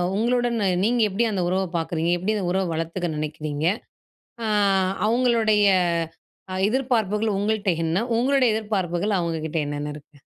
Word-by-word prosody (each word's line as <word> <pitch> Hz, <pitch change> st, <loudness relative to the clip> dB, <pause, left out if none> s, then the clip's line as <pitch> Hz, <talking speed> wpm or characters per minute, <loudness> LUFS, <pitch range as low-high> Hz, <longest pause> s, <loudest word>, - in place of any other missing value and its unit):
உங்களுடன் 240 Hz, +1 st, +1 dB, 0.3 s
நீங்க 235 Hz, +3 st, +2 dB
எப்படி 205 Hz, +5 st, 0 dB
அந்த 190 Hz, -3 st, -1 dB
உறவ 190 Hz, +1 st, +1 dB
பாக்குறீங்க 165 Hz, +1 st, -1 dB
எப்படி 210 Hz, +5 st, -1 dB
அந்த 190 Hz, -, -2 dB
உறவ 190 Hz, +1 st, +1 dB
வளத்துக்க 165 Hz, +2 st, -3 dB
நினைக்கிறீங்க? 150 Hz, 0 st, -3 dB, 0.8 s
அ -, -, -1 dB, 0.6 s
அவங்களுடைய 225 Hz, -3 st, +3 dB, 1.0 s
எதிர்ப்பார்ப்புகள் 220 Hz, -4 st, 0 dB
உங்கள்ட்ட 205 Hz, -1 st, 0 dB, 0.2 s
என்ன? 170 Hz, +7 st, 0 dB
உங்களுடைய 265 Hz, +1 st, +3 dB
எதிர்பார்ப்புகள் 200 Hz, -2 st, -1 dB
அவங்ககிட்ட 165 Hz, -1 st, -3 dB
என்னென்ன 145 Hz, 0 st, -4 dB
இருக்கு? 150 Hz, 0 st, -15 dB
200 Hz, 120 wpm, -24 LUFS, 165-225 Hz, 1.0 s, அவங்களுடைய